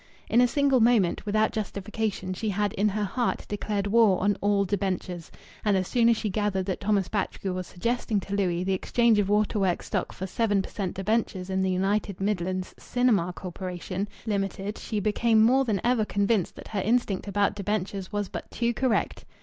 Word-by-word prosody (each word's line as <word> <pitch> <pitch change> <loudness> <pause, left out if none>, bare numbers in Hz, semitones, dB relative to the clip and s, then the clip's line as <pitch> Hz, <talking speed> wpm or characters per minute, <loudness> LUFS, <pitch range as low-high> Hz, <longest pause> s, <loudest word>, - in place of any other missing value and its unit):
In 235 - +5
a 250 - +5
single 275 0 +3
moment, 225 -5 +3
without 215 +1 +2
justification, 205 -2 -3
she 215 +3 -3
had 205 0 0
in 210 +2 +2
her 210 +1 -1
heart 240 +5 -1
declared 205 -1 -2
war 205 -2 +4
on 200 +1 +2
all 200 -1 +2
debentures. 185 -3 -2 0.3
And 205 -2 +3
as 185 -1 -1
soon 235 -1 +3
as 230 - +4
she 215 - -2
gathered 200 -2 -1
that 190 -1 -2
Thomas 200 -2 +1
Batchgrew 195 -2 -2
was 185 -1 -4
suggesting 225 +2 -1
to 195 - -7
Louis 180 -3 0
the 190 +1 0
exchange 230 +3 +2
of 200 -1 +1
waterworks 205 -3 +1
stock - - -2
for 190 - -6
seven 205 0 +1
per - - -9
cent. 190 -4 -3
debentures 195 -2 -1
in 190 0 +1
the 190 - +1
United 195 +1 0
Midland 185 -2 -2
Cinemas 220 -8 +1
Corporation, 185 +1 -5 0.2
Limited, 200 -1 -2
she 215 - -3
became 220 +2 +3
more 260 +4 +4
than 210 -5 0
ever 240 -2 +2
convinced 200 -2 0
that - - -11
her 205 -3 -1
instinct 215 -2 0
about 200 0 +1
debentures 200 -1 -3
was 205 -1 -1
but - - -7
too 235 0 0
correct. 245 -3 0
205 Hz, 190 wpm, -27 LUFS, 190-220 Hz, 0.3 s, In